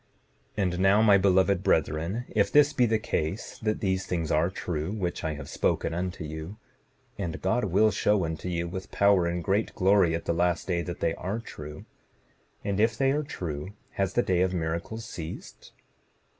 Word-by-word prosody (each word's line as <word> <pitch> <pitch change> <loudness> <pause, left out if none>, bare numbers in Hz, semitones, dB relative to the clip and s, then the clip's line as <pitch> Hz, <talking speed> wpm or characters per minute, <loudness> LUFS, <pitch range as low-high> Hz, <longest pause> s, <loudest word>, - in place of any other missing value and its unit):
7:35 100 - +2
And 90 -1 -1
now, 95 +3 +5
my 100 -3 +6
beloved 95 0 +3
brethren, 85 +9 0
if 105 -2 +1
this 150 -1 +5
be 125 - +3
the 110 0 +2
case 95 -2 -3
that 110 -1 -1
these 95 -1 0
things 85 -3 -2
are 80 +3 +3
true 85 -3 -3
which 95 -6 -3
I 80 -2 -2
have - - -8
spoken - - 0
unto 90 0 -3
you, 80 +6 -7 0.6
and 85 -5 -3
God 110 +6 +1
will 105 +3 +3
show 105 -3 +2
unto 80 +2 -4
you, 85 -1 -2
with 95 +2 -6
power 100 -3 +3
and 85 0 -2
great 100 +6 0
glory 95 -3 +4
at 85 - -5
the - - +1
last 85 0 +1
day, 85 -2 0
that 85 0 -6
they 80 - +1
are 95 +6 -3
true, 75 -9 -9 0.8
and 100 0 -1
if 115 +2 +2
they 135 0 +3
are 150 +2 +1
true 90 - -5 0.2
has 95 -1 -1
the 120 - +2
day 90 -1 +1
of 95 0 +1
miracles 85 +7 -3
ceased? 80 -5 -8
95 Hz, 190 wpm, -27 LUFS, 85-105 Hz, 0.8 s, my